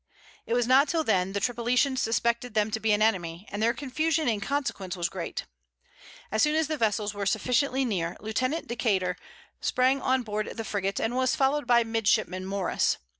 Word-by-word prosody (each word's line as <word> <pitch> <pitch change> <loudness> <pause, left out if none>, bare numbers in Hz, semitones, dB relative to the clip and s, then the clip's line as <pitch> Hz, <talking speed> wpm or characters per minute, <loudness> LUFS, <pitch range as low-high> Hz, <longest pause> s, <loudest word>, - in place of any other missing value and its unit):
It 230 - 0
was 245 -1 +2
not 265 +4 +5
till 325 -2 +1
then 190 -6 +1
the 200 - 0
Tripolitans 245 +4 +1
suspected 235 +1 0
them 215 0 +2
to 220 - -1
be 220 0 +1
an 210 +1 +3
enemy; 180 -3 -1
and 205 - -4
their 230 +1 +4
confusion 310 +4 -1
in 215 -4 0
consequence 200 -9 -3
was 170 -1 -1
great. - - -5 0.9
As 220 +1 +1
soon 300 +3 +3
as 320 0 +2
the 310 - -1
vessels 215 -4 0
were 200 -1 -3
sufficiently 255 +5 +1
near, 175 -7 -2
Lieutenant 255 +9 -2
Decater 200 -6 0 0.4
sprang 260 +2 +2
on 260 -1 +1
board 215 0 -4
the 225 - -4
frigate, 195 -1 -2
and 230 +2 -1
was 255 0 +2
followed 275 0 +1
by 240 -1 +5
midshipman 215 -4 0
Morris. 195 -2 0
225 Hz, 185 wpm, -27 LUFS, 205-260 Hz, 0.9 s, not